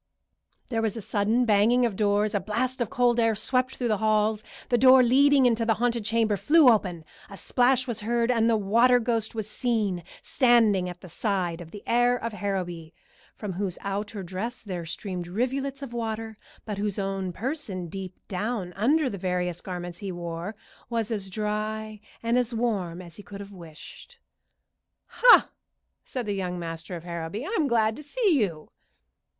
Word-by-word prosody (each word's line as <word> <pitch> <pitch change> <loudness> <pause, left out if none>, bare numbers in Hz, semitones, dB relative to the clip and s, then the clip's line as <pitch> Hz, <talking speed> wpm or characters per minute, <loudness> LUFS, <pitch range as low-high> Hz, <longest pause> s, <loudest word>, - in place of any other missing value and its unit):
There 225 -3 0
was 225 0 -1
a - - -3
sudden 215 +5 +1
banging 225 +3 +4
of 225 -5 -1
doors, 205 0 +1
a 205 - +2
blast 245 +6 -2
of 230 - 0
cold 245 0 +2
air 225 -1 +3
swept 255 +4 0
through 245 -2 -2
the 215 - +2
halls, 215 0 +1 0.3
the 240 - +3
door 260 +1 +7
leading 275 +2 +5
into 230 -2 +3
the 225 -1 +2
haunted 235 0 0
chamber 220 -1 +2
flew 305 - +6
open, 185 -8 +1 0.2
a 200 - -10
splash 255 +3 +2
was 240 -3 -3
heard, 235 +2 +1
and 230 -1 +2
the 225 - +3
water 235 +5 +4
ghost 230 -2 -1
was 220 -2 -3
seen 215 -7 -1 0.2
standing 225 -7 +3
at 180 0 -10
the 185 - -11
side 180 -2 -2
of 165 - -10
the 205 +3 -10
heir 245 +1 +3
of 230 -2 -5
Harrowby, 180 -5 -4 0.4
from 205 -3 -5
whose 185 -1 -3
outer 200 +1 -4
dress 190 +7 -5
there 180 -5 -5
streamed 180 +1 -4
rivulets 265 +7 -2
of 250 -4 -7
water, 225 -1 -4 0.3
but 210 -2 -4
whose 205 -1 -2
own 195 -2 -2
person 210 - -4
deep 185 +1 -7
down 200 -1 -3
under 275 - +2
the 200 -6 -4
various 180 -1 -2
garments 175 -2 -6
he 195 -2 -5
wore 175 +3 -5 0.3
was 230 -2 -1
as 200 -3 -3
dry 215 +1 -3 0.2
and 235 +2 +2
as 240 -1 -1
warm 190 -7 -2
as 170 -2 -13
he - - -9
could 200 0 -10
have 200 0 -9
wished. 175 - -12 0.9
"Ha!" - - +6 0.5
said 250 -3 -5
the 205 - -1
young 180 -2 -3
master 165 +1 -6
of 165 - -8
Harrowby. 170 - -5
"I'm 365 -7 0
glad 225 -3 +2
to - - -8
see 400 +8 0
you." 170 -8 -2
215 Hz, 180 wpm, -26 LUFS, 190-240 Hz, 0.9 s, door